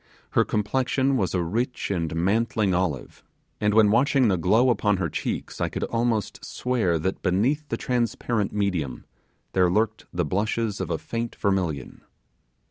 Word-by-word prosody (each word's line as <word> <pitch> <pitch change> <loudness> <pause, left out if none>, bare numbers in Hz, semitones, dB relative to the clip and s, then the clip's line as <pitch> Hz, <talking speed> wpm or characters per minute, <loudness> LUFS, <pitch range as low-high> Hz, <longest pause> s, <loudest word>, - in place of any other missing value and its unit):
Her - - +4
complexion 130 +5 0
was 95 -6 0
a 90 - +1
rich 115 +7 -2
and 85 -4 -1
mantling 100 +2 +1
olive, 90 -7 -2 0.4
and 105 0 +1
when 110 -2 +6
watching 130 +1 +3
the 95 - +3
glow 110 +9 +3
upon 105 -4 +1
her 90 -3 -1
cheeks - - -4
I - - +1
could - - -4
almost 115 -3 -1
swear 115 -10 0
that 95 +5 -2
beneath 130 +12 +1
the - - -1
transparent 120 -3 -1
medium 90 -11 -2 0.5
there 90 -1 +4
lurked 110 +3 0
the 85 -1 -1
blushes 105 +4 -1
of 90 - -3
a 85 - 0
faint 115 +5 -4
vermilion. 90 -9 -1
105 Hz, 155 wpm, -25 LUFS, 90-115 Hz, 0.5 s, when